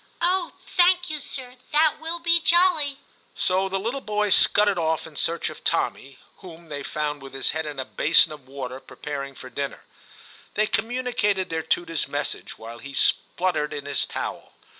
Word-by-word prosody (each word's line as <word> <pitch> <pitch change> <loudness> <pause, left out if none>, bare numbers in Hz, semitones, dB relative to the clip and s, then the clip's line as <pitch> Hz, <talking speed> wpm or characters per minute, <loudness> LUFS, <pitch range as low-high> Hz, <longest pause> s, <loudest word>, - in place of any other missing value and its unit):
* - - -34
Oh, 360 0 +2
thank 355 -1 +3
you, 305 - -2
sir; 255 -2 -5 0.2
that 305 0 +4
will 325 +2 -2
be 340 0 +3
jolly! 330 -5 +4 0.2
' - - -35
So 190 +1 +1
the 195 - 0
little 235 +7 -2
boys 210 -3 +2
scudded 205 -3 +5
off 160 -1 0
in 160 -2 -12
search 170 +3 0
of - - -12
Tommy, 135 0 -1 0.2
whom 170 -3 -12
they 145 -1 -4
found 150 +1 -3
with 135 0 -10
his 135 - +1
head 160 0 -3
in 145 -2 -6
a 130 - -2
basin 155 +5 +4
of 145 -4 -11
water, 130 -1 -6
preparing 140 -1 -6
for 130 - -10
dinner. 140 -1 -4 0.7
They 215 - +3
communicated 225 -5 0
their 160 0 -1
tutor 165 +1 -1
s 160 - 0
message, - - -4
while 115 +1 -9
he 140 +2 -9
sputtered 175 -5 +1
in 145 - -5
his 145 -1 0
towel. - - -5
175 Hz, 185 wpm, -25 LUFS, -, 0.7 s, scudded